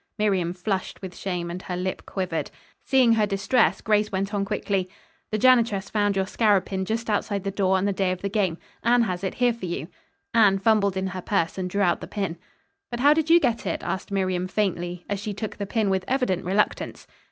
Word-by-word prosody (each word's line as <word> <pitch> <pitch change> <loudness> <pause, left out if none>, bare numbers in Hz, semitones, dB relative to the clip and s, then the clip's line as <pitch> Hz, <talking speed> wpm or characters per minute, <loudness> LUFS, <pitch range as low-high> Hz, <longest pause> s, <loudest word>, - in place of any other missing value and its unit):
Miriam 195 -5 +1
flushed 185 +1 -3
with 185 -1 -7
shame 175 -3 -3
and 180 +1 -5
her 180 -2 -4
lip 185 +1 -4
quivered. 185 -4 -2 0.3
Seeing 255 -4 +4
her 215 -2 +2
distress, 200 +5 +2
Grace 210 -1 +2
went 195 +2 -2
on 200 -1 0
quickly: 195 -1 -1 0.4
"The 215 - -1
janitress 230 -5 +3
found 205 -2 +1
your 190 0 +1
scarab 205 -1 +2
pin 190 -1 -3
just 225 +3 -2
outside 205 -2 -1
the 195 - -2
door 190 -1 +2
on 190 - 0
the 200 - +1
day 190 -1 0
of 185 +1 -5
the - - +1
game. 195 -5 0 0.3
Anne 240 +1 +4
has 180 -4 -3
it 190 - -2
here 245 -1 +3
for 225 -5 -6
you." 170 -1 -4 0.4
Anne 210 -4 +5
fumbled 200 -2 +2
in 190 - -1
her 190 -1 -4
purse 180 -3 0
and 180 -1 -2
drew 200 +2 0
out 175 -2 +2
the - - -6
pin. 195 -5 -3 0.5
"But 240 0 -4
how 290 +2 +7
did 320 0 0
you 340 +1 +8
get 235 - 0
it?" 170 - -2
asked 190 +3 -4
Miriam 185 -2 0
faintly, 175 -3 -2
as 205 -1 -2
she 205 0 -4
took 215 +1 -5
the 200 - -4
pin 220 -1 0
with 190 -1 0
evident 250 -10 0
reluctance. 195 +3 0
195 Hz, 220 wpm, -25 LUFS, 185-215 Hz, 0.5 s, you